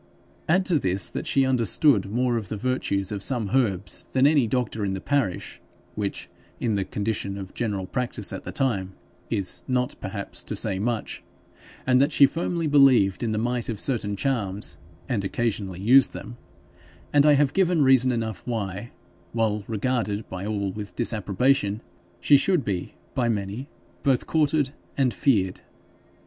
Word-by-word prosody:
Add 185 +3 +3
to 170 -5 +2
this, 95 -4 -1
that - - -5
she 135 -1 +3
understood 120 - +3
more 120 +3 +1
of 110 -5 -3
the 105 - -3
virtues 100 -5 -1
of 100 -2 -3
some 115 -4 -1
herbs 105 -8 0
than 130 +1 +4
any 145 -5 +4
doctor 115 -3 -1
in 95 -1 -1
the - - -4
parish, 135 -7 -2 0.3
which, 100 -2 -3 0.3
in 115 -3 0
the 100 -1 0
condition 100 -1 -3
of 95 -1 -8
general 105 -5 -2
practice 110 -3 -3
at - - -6
the - - -6
time, 100 -9 -1 0.4
is 95 -2 -2
not 125 -1 0
perhaps 100 0 -5
to - - -4
say 95 - 0
much, 115 +1 -2 0.6
and 130 0 +4
that 140 +3 +3
she 140 - +7
firmly 170 +2 -2
believed 135 -10 +5
in 115 -2 -1
the 110 - -1
might 120 +2 -1
of 110 -4 -3
certain 105 -6 0
charms, 105 -5 -2 0.3
and 105 -5 -1
occasionally 100 -3 -2
used 125 +7 +5
them 120 - -8 0.8
and 145 -1 +6
I 150 0 +6
have 145 -1 +3
given 180 -5 +3
reason 130 -1 +5
enough 110 -6 -3
why, 105 -2 -3 0.4
while 110 -2 0
regarded 110 -2 -1
by 95 +2 -4
all 100 -2 -1
with 105 0 -8
disapprobation 110 0 +1 0.4
she 145 +9 +6
should 175 +1 +1
be 95 -3 -3 0.2
by 120 -2 +1
many 105 +5 -3 0.3
both 135 -3 +2
courted 150 -3 +1 0.3
and 130 -4 +2
feared. 95 -6 +1
115 Hz, 165 wpm, -25 LUFS, 100-130 Hz, 0.8 s, she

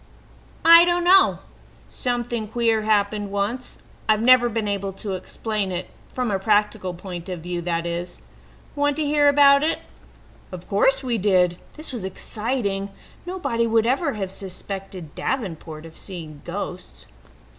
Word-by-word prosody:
"I 335 +1 +10
don't 350 0 +1
know. 375 +2 +6 0.5
Something 240 -3 -2
queer 225 0 +1
happened 205 -1 +1
once. 205 +6 -3 0.3
I've 215 0 +3
never 250 0 +6
been 220 -2 -2
able 200 -1 -2
to 195 +1 -5
explain 200 +2 -3
it 180 0 -5 0.2
from 250 -4 -2
a 195 - 0
practical 205 -3 +1
point 175 0 -8
of 180 -3 -5
view, 175 +1 -4
that 170 -1 -2
is. 170 +1 -4 0.6
Want 290 0 +1
to 310 - -1
hear 290 0 +3
about 280 -1 +6
it?" 315 +2 +1 0.7
Of - - -9
course - - +2
we 240 -3 -1
did. 180 -3 +2 0.2
This 310 -3 -6
was 235 -6 -4
exciting. 200 0 -2 0.4
Nobody 275 -11 -1
would 225 0 +3
ever 275 +4 +1
have 195 -3 -4
suspected 190 -3 -7
Davenport 165 - -4
of 160 - -12
seeing 160 -6 -8
ghosts. - - -7
210 Hz, 145 wpm, -23 LUFS, 185-255 Hz, 0.7 s, I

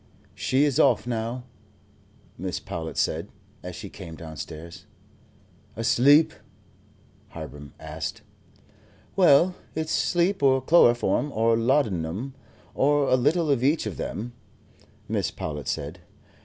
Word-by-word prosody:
"She 130 +2 +1
is 145 -3 +1
off 125 -5 +4
now," 120 +1 -3 1.0
Mrs. - - -4
Powlett 80 -1 -5
said, - - 0 0.3
as - - -7
she - - -7
came 80 - -9
downstairs. 80 +1 -9 0.9
"Asleep?" 140 +7 +4 0.9
Hiram 75 -3 -9
asked. - - -6 0.9
"Well, 180 -1 +5 0.2
it's 160 0 -2
sleep, 180 +2 +1
or 135 -1 +4
chloroform, 130 0 +3
or 115 0 +2
laudanum, 115 - 0 0.4
or 145 0 +2
a - - +5
little 150 +5 +2
of 130 -3 +1
each 150 +1 +2
of 100 -9 -5
them," 120 +3 -5 0.7
Mrs. - - -2
Powlett 75 -3 -5
said. 75 +4 -3
125 Hz, 115 wpm, -25 LUFS, -, 1.0 s, Well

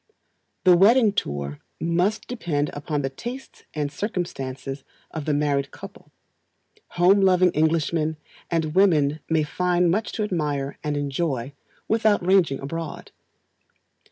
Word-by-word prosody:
The 180 -2 +7
Wedding 215 +4 +5
Tour 70 - -3 0.2
must 175 +6 0
depend 160 -12 -2
upon 145 0 -3
the 135 - -1
tastes 245 - -8
and 145 -2 -2
circumstances 140 - -4 0.3
of 160 -3 -5
the 150 - +1
married 145 -2 0
couple. - - -12 0.9
Home 190 +3 +5
loving 185 -2 +4
Englishmen 160 0 +1 0.3
and 160 -2 -1
women 155 -6 +3
may 160 -1 +2
find 180 +2 +1
much 210 +4 -1
to 220 - -1
admire 150 -8 -2
and 150 -1 -1
enjoy 140 -2 -2 0.3
without 215 -4 +2
ranging 180 -7 +3
abroad. 165 +3 -6
160 Hz, 125 wpm, -24 LUFS, 145-185 Hz, 0.9 s, The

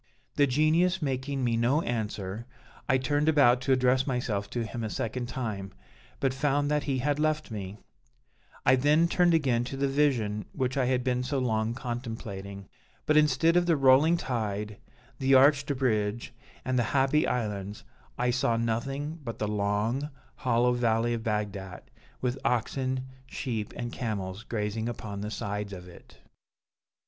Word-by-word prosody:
"The 145 - +4
Genius 160 +7 +2
making 135 -2 -2
me 120 -2 +1
no 125 +8 +2
answer, 110 -1 -3 0.4
I 130 - +5
turned 145 +3 +1
about 125 -5 +5
to 135 - -1
address 130 +1 +3
myself 115 -6 -2
to 120 -2 -2
him 115 +2 -5
a 110 - -2
second 120 +3 -3
time, 105 -7 -4 0.5
but 135 -2 +1
found 145 +1 +1
that 150 -1 +1
he 135 -2 0
had 145 +3 0
left 155 -3 0
me; 100 -2 -6 0.9
I 130 +1 +6
then 150 +5 +4
turned 175 -1 +3
again 130 -7 +2
to 135 +2 -5
the 140 +1 +1
Vision 120 -8 +1
which 130 0 -1
I 135 -2 +2
had 125 0 +1
been 125 -1 0
so 130 +3 -2
long 115 -2 0
contemplating; 110 -6 -6 0.4
but 150 - +2
instead 155 +2 +4
of 175 0 +3
the 165 -3 +3
rolling 140 +5 +5
tide, 105 -6 -3 0.4
the 135 0 +4
arched 140 +2 +5
bridge, 115 -2 -1 0.3
and 130 -1 +1
the 120 +3 0
happy 135 +3 +3
islands, 105 -4 -3 0.3
I 125 0 +1
saw 120 -2 +1
nothing 135 +7 -2
but 115 -3 -5
the 105 - -2
long, 105 +7 -1 0.3
hollow 125 -1 +2
valley 120 -1 +1
of 115 - -2
Bagdat, 105 -4 -4 0.3
with 125 +1 -1
oxen, 130 +2 -1 0.2
sheep, 115 -6 -4
and 120 0 -5
camels 100 -4 -4
grazing 110 0 -3
upon 105 -4 -6
the 105 - -4
sides 105 -1 -4
of 90 -1 -9
it." 90 - -15
125 Hz, 160 wpm, -28 LUFS, 110-135 Hz, 0.9 s, I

